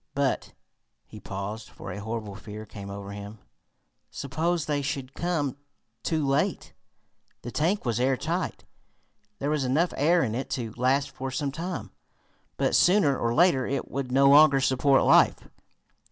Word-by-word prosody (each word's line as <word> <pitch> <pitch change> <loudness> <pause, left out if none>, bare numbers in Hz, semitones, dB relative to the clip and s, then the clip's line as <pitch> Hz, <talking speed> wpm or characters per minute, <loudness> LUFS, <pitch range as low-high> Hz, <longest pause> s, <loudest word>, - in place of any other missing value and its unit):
But 140 -2 -1 0.3
" - - -52 0.2
He 110 - -12
paused, 100 +3 -6
for 95 - -9
a 95 - -6
horrible 110 -1 -5
fear 105 +1 -9
came 100 -1 -9
over 100 0 -7
him. 100 +1 -8 0.7
"Suppose 160 +4 -2
they 145 -1 -1
should 135 -2 -4
come 150 -7 -2 0.4
too 155 +1 -1
late?" 135 0 0 0.7
The 120 - -6
tank 170 - 0
was 120 -1 0
airtight. 145 +7 -1 0.7
There 140 +5 -2
was 150 -3 0
enough 150 +8 +1
air 165 +4 +3
in 110 - -2
it 130 +4 -3
to 115 -3 -5
last 130 +3 +1
for 135 0 -5
some 140 +2 -2
time, 150 - -5 0.7
but, - - +1
sooner 175 -7 +4
or 115 -1 -1
later, 160 -6 +4
it 140 - -3
would 135 -2 -3
no 135 +2 +5
longer 140 0 +7
support 135 +1 +3
life. - - +4
135 Hz, 155 wpm, -27 LUFS, 115-150 Hz, 0.7 s, longer